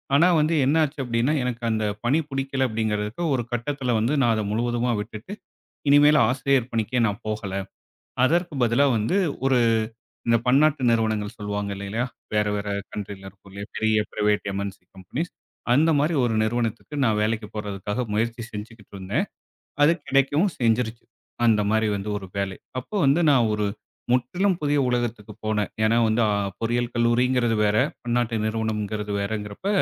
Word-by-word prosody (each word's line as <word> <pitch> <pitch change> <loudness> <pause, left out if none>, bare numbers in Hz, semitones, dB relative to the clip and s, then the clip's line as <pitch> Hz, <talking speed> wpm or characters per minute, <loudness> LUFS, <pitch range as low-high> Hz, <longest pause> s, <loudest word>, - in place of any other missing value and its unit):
ஆனா 165 +5 +6
வந்து 155 +2 +2
என்ன 150 +4 +3
ஆச்சு 150 -1 -4
அப்டின்னா, 120 +3 +1
எனக்கு 125 -1 -3
அந்தப் 105 -2 -1
பணி 140 +7 +3
புடிக்கல 135 -1 -1
அப்டிங்கறதுக்கு 110 +4 -2
ஒரு 125 -2 0
கட்டத்துல 125 +1 -1
வந்து 115 +6 +1
நான் 120 -3 +4
அதை 110 - -1
முழுவதுமா 120 +2 0
விட்டுட்டு 110 - -8 0.6
இனிமேல் 145 +1 +6
ஆசிரியர் 130 -1 +1
பணிக்கே 115 +2 0
நான் 100 -1 -4
போகல. 105 -3 -3 0.7
அதற்குப் 165 -2 +1
பதிலா 120 +5 +3
வந்து 110 - 0 0.3
ஒரு 135 -2 +4 0.7
இந்த 115 - +5
பன்னாட்டு 140 +3 +4
நிறுவனங்கள் 110 -2 0
சொல்லுவாங்க 105 -1 -3
இல்லலையா, 100 +5 -2 0.3
வேற 105 0 +3
வேற 105 0 -4 0.2
கன்ட்ரில 100 -1 -7
இருக்கும் 95 +1 -17
இல்லையா, 100 +1 -7
பெரிய 110 0 +2 0.2
பிரைவேட் 105 0 +1
எம்ன்சி 100 -1 -5
கம்பெனிஸ். 135 - -5 0.4
அந்த 155 +5 +4
மாரி 155 +4 +1
ஒரு 115 -2 0
நிறுவனத்துக்கு 115 +4 -2
நான் 110 -3 +2
வேலைக்குப் 110 0 -2
போறதுக்காக 105 +1 -4
முயற்சி 115 +2 -1
செஞ்சிகிட்டு 105 0 -9
இருந்தேன். 100 - -1 0.6
அது 155 +3 +6
கிடைக்கவும் 145 +7 +2
செஞ்சிருச்சு. 115 -1 0 0.4
அந்த 110 -2 +4
மாரி 110 0 +2
வந்து 100 +1 -4
ஒரு 95 -2 -8
வேலை. 100 -1 -2 0.2
அப்ப 125 - -14
வந்து 145 +6 +4
நான் 120 -5 +4
ஒரு 105 -1 0 0.5
முற்றிலும் 180 +10 +1
புதிய 145 -1 +2
உலகத்துக்குப் 115 -3 -3
போனேன். 105 -1 0
ஏன்னா 115 +2 +3
வந்து 110 +2 +2
ஆ, - - +2 0.3
பொறியியல் 120 +1 -1
கல்லூரிங்கிறது 120 0 +2
வேற, 105 0 +2 0.3
பன்னாட்டு 120 -1 0
நிறுவனம்ங்கிறது 110 -1 -2
வேறங்கிறப்ப 105 - -4
115 Hz, 150 wpm, -24 LUFS, 105-130 Hz, 0.7 s, ஆனா